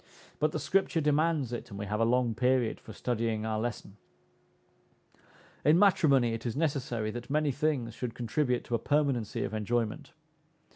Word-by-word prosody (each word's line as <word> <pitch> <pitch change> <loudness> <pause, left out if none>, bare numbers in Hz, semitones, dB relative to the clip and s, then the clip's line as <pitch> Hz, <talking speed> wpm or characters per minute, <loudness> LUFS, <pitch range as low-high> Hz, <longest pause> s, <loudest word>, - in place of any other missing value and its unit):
But 155 0 +2
the - - -2
Scripture 190 -3 +1
demands 150 -3 +1
it, 120 - -5
and 100 - -8
we 100 - -4
have 105 +1 -2
a 115 - +3
long 120 0 +2
period 125 0 +1
for - - -12
studying 115 -1 -2
our 110 -1 -1
lesson. 110 -3 -5 1.7
In 150 +4 +5
matrimony 145 - +4
it 115 - -5
is 120 -3 -3
necessary 135 -8 -1
that 120 +1 -7
many 150 0 +1
things 135 -4 -1
should 120 0 -5
contribute 125 +1 0
to - - -7
a 115 - +2
permanency 140 -7 0
of - - -4
enjoyment. 115 +6 -2
125 Hz, 165 wpm, -30 LUFS, 115-145 Hz, 1.7 s, In